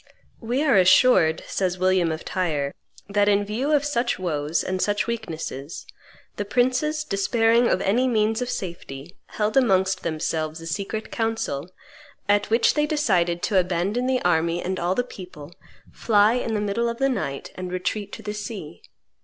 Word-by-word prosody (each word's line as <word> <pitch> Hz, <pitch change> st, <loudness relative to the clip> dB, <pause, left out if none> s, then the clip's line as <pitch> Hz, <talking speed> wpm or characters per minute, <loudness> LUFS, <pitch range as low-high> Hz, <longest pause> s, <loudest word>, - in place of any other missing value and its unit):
"We 245 Hz, +5 st, -1 dB
are 275 Hz, -9 st, +4 dB
assured," 185 Hz, -3 st, +5 dB
says 185 Hz, -2 st, -1 dB
William 185 Hz, -2 st, +2 dB
of 155 Hz, -, -5 dB
Tyre, 150 Hz, -7 st, -1 dB, 0.3 s
"that 205 Hz, 0 st, +2 dB
in 205 Hz, 0 st, +2 dB
view 240 Hz, +8 st, -2 dB
of 290 Hz, -1 st, +3 dB
such 245 Hz, -4 st, 0 dB
woes 155 Hz, -3 st, -1 dB
and 185 Hz, 0 st, -2 dB
such 205 Hz, 0 st, +1 dB
weaknesses, 165 Hz, -, -5 dB, 0.5 s
the 205 Hz, -, -1 dB
princes, 255 Hz, +8 st, +1 dB
despairing 230 Hz, +1 st, +2 dB
of 185 Hz, -, +1 dB
any 240 Hz, +7 st, +2 dB
means 220 Hz, -1 st, +1 dB
of 250 Hz, -, -2 dB
safety, 170 Hz, -, -6 dB
held 215 Hz, 0 st, -2 dB
amongst 190 Hz, -7 st, +3 dB
themselves 160 Hz, 0 st, -2 dB
a 165 Hz, -, -10 dB
secret 200 Hz, +6 st, -4 dB
council, 225 Hz, -, -2 dB, 0.6 s
at 205 Hz, 0 st, +2 dB
which 230 Hz, +1 st, +3 dB
they 300 Hz, 0 st, +1 dB
decided 180 Hz, -, +1 dB
to 195 Hz, -3 st, +3 dB
abandon 185 Hz, +7 st, 0 dB
the 260 Hz, -1 st, 0 dB
army 170 Hz, 0 st, +1 dB
and 185 Hz, +1 st, -3 dB
all 175 Hz, +2 st, 0 dB
the 245 Hz, -, +1 dB
people, 180 Hz, -9 st, -11 dB, 0.4 s
fly 210 Hz, 0 st, +3 dB
in 235 Hz, -2 st, -1 dB
the 210 Hz, -, 0 dB
middle 210 Hz, +3 st, 0 dB
of 235 Hz, -, -4 dB
the 270 Hz, -, +2 dB
night, 140 Hz, -, -3 dB
and 185 Hz, -1 st, -6 dB
retreat 200 Hz, +3 st, -3 dB
to 220 Hz, -, -8 dB
the 210 Hz, 0 st, -4 dB
sea." 205 Hz, -, -7 dB
200 Hz, 170 wpm, -24 LUFS, 175-235 Hz, 0.6 s, assured